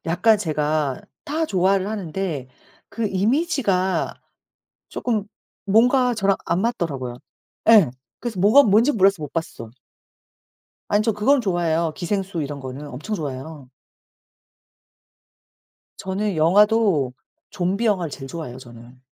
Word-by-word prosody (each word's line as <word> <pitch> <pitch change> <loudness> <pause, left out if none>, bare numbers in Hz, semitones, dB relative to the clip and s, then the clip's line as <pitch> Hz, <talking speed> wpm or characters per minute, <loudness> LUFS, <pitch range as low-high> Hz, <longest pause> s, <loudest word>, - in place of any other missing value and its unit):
약간 215 +6 +3
제가 150 -5 -1 0.2
다 320 +2 -1
좋아를 190 -1 +1
하는데 180 -9 -4 0.4
그 230 -2 -3
이미지가 205 - 0 0.8
쪼끔 220 -5 -2 0.4
뭔가 245 +5 +4
저랑 195 -3 +1
안 170 +3 0
맞더라고요. 140 - -2 0.5
예. 200 - +7 0.3
그래서 225 -6 -5
뭐가 215 +9 +6
뭔지 225 +6 +4
몰라서 195 - +3
못 145 -1 -6
봤어. 160 -9 -5 1.2
아니 205 +1 +2
저 225 0 +1
그건 250 +7 +2
좋아해요. 170 -5 0
기생수 190 -2 -2
이런 140 0 -5
거는 130 +3 -7
엄청 150 - -5
좋아해요. 140 -2 -7 2.3
저는 190 0 -3
영화도 190 - +3 0.4
좀비 195 +6 -1
영화를 180 -7 0
제일 135 -1 -8
좋아해요 130 -6 -7
저는. 120 0 -14
185 Hz, 255 characters per minute, -22 LUFS, 150-215 Hz, 2.3 s, 예